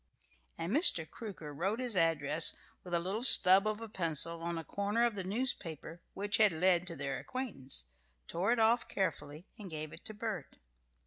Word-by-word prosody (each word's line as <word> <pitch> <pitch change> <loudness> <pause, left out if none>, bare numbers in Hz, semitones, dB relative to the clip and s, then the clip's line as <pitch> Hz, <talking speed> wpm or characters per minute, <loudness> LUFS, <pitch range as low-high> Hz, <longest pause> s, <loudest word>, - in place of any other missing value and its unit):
And 170 +5 -4
Mr. 180 - +5
Crooker 175 -10 -9
wrote 190 +9 -2
his 250 -4 -4
address 160 -2 +2 0.3
with 175 -1 -4
a - - +1
little 190 +6 -4
stub 195 -4 +8
of 215 +1 -3
a 225 - -7
pencil 165 -3 -1
on 170 0 -4
a 165 - -5
corner 205 +7 -1
of 235 - -1
the 195 -2 -5
newspaper 180 - -4
which 205 +1 -1
had 215 -2 +4
led 180 +1 +1
to 170 - -6
their 135 -2 -4
acquaintance, 140 - -5 0.4
tore 180 +6 -1
it 245 - +1
off 225 +1 +2
carefully, 155 -3 -4
and 200 -3 -9
gave 155 -1 -7
it - - -11
to 215 - -5
Bert. 210 -9 -6
185 Hz, 185 wpm, -32 LUFS, 160-215 Hz, 0.4 s, stub